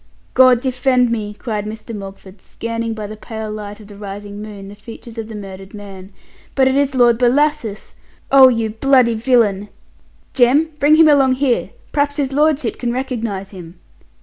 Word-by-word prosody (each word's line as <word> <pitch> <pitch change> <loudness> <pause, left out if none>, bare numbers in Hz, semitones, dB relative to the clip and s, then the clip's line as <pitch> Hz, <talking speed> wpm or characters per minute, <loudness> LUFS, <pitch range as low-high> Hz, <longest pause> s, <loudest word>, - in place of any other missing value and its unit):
"God 255 -2 +5
defend 255 -1 +1
me!" 210 -2 -3
cried 210 -3 -4
Mr. 220 +1 -7
Mogford, 195 -1 -10
scanning 230 0 -5
by 215 -1 -6
the 215 +1 -7
pale 220 0 -7
light 210 0 -7
of 215 - -13
the 205 0 -13
rising 205 0 -8
moon 205 -2 -9
the 200 - -11
features 225 +2 -11
of 220 - -5
the 225 - -9
murdered 195 -1 -9
man, 195 -2 -11 0.4
"but 265 -1 +4
it 265 - +1
is 280 -1 +1
Lord 240 -2 +4
Bellasis! 250 -3 0 0.4
oh, 270 -1 +8
you 230 -3 0
bloody 250 +1 +3
villain! 220 -4 +1 0.6
Jem, 275 +6 +3
bring 295 +2 +5
him 320 0 +6
along 275 -3 +4
here, 260 -2 0 0.2
p'r'aps 285 0 0
his 275 -2 -1
lordship 295 -3 +1
can 240 -1 -2
recognize 230 -7 -4
him!" 175 -2 -12
230 Hz, 175 wpm, -18 LUFS, 205-260 Hz, 0.6 s, oh